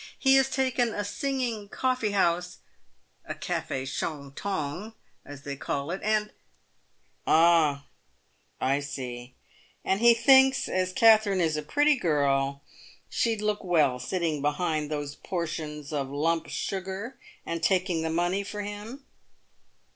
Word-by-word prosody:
He 265 -1 +4
has 270 0 +3
taken 255 -3 0
a 205 - -2
singing 235 -2 -3
coffee 255 -3 0
house 180 -2 0 0.3
— - - -41
a - - -5
cafe 130 - -3
shontong, 155 +7 -4 0.3
as 145 0 -11
they 140 -1 -5
call 140 +2 -3
it 185 - -4
— - - -14
and 215 0 +1 0.3
" - - -42 0.2
" - - -42
Ah, 160 -4 +4 0.7
I 135 +2 +1
see; 125 -3 -7 0.5
and 190 - +1
he 235 0 +6
thinks, 265 +2 +5
as 185 0 -1
Katherine 215 -1 +5
is 160 -3 +1
a 150 - -2
pretty 290 - +2
girl, 140 - 0 0.5
she'd 225 -2 0
look 210 -1 -1
well 150 -8 +2
sitting 165 -2 -2
behind 150 +1 -1
those 145 -2 -4
portions 155 -4 -5
of 140 -2 -2
lump 160 +3 0
sugar, 195 +5 -4 0.3
and 170 -1 -3
taking 185 -3 +1
the 160 - -2
money 175 +4 0
for 205 +1 -5
him." 210 +7 -8
175 Hz, 140 wpm, -27 LUFS, 145-210 Hz, 0.7 s, he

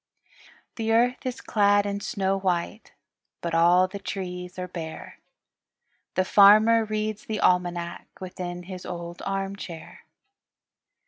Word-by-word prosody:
The 225 -1 -1
earth 245 +3 +2
is 255 - -4
clad 205 -2 +3
in 200 0 -2
snow 195 -1 -1
white, 185 +3 -2 0.5
But 170 -1 -4
all 175 +2 +5
the 200 +2 -8
trees 180 -2 -6
are 180 0 -4
bare. 165 -3 -8 1.0
The 185 - +2
farmer 215 +4 +6
reads 215 -1 -3
the 215 -1 -3
almanac 175 -1 0
Within 180 -1 -6
his 185 0 -8
old 170 -1 -7
arm 195 0 -2
chair. 170 -5 -9
190 Hz, 125 wpm, -25 LUFS, 180-210 Hz, 1.0 s, farmer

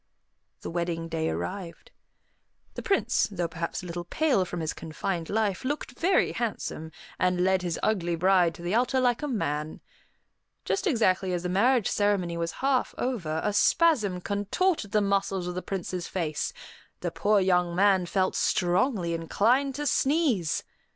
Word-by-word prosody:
The - - -6
wedding 170 -1 -2
day 160 0 -1
arrived. 190 - -5 0.8
The - - -6
Prince, 390 - +1
though 180 -4 -2
perhaps 170 +1 -4
a - - -7
little 175 0 -5
pale 260 - +1
from 175 0 -5
his 160 -1 -2
confined 165 +1 -4
life, 210 -1 0
looked 285 0 -3
very 370 +3 +3
handsome, 205 -8 -4 0.3
and 180 -1 +2
led 190 0 +2
his 175 -3 -3
ugly 175 -5 +1
bride 180 -1 +3
to 170 - -11
the 175 +3 -2
altar 250 +3 +2
like 245 0 +2
a 295 - -2
man. 155 - -2 0.9
Just 390 +1 0
exactly 190 - +2
as 175 -1 -2
the 180 - -2
marriage 230 +4 +3
ceremony 200 -4 +1
was 170 0 -2
half 270 -2 +1
over, 170 -12 -2
a 210 - 0
spasm 210 - +3
contorted 205 - -1
the 210 -1 +3
muscles 195 -2 0
of 180 - -3
the 180 - -3
Prince's 185 -2 -4
face; 160 -5 -2 0.5
the - - -2
poor 210 0 +2
young 180 -2 +2
man 190 -1 +3
felt 190 +1 +1
strongly 180 0 +1
inclined 235 - +1
to 295 +1 -3
sneeze. 270 - +1
190 Hz, 160 wpm, -27 LUFS, 175-230 Hz, 0.9 s, very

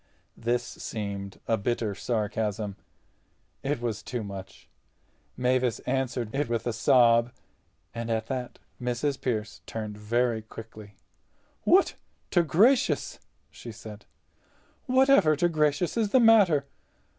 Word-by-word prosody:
This 120 +1 0
seemed 100 -4 -6
a 115 - +2
bitter 110 0 -1
sarcasm. 105 -2 -2 0.9
It 140 -1 -1
was 115 -3 -3
too 120 +2 -4
much. 100 -2 -9 0.7
Mavis 125 -1 +1
answered 125 -3 -2
it 140 -1 -1
with 115 -1 -1
a 120 - -1
sob. 120 0 +4 0.6
And 115 0 -5
at 110 -1 0
that 125 0 -5 0.2
Mrs. 125 +3 -1
Pearce 110 -4 -3
turned 110 -2 -5
very 115 +1 0
quickly. 110 -2 -11 0.7
"What - - +5 0.4
to 175 - +4
gracious!" 205 - +2 0.3
she - - -9
said—"whatever 260 - 0
to 175 +4 +2
gracious 155 0 +1
is 225 -3 +1
the 260 - +5
matter? 205 - +5
120 Hz, 115 wpm, -27 LUFS, 110-145 Hz, 0.9 s, What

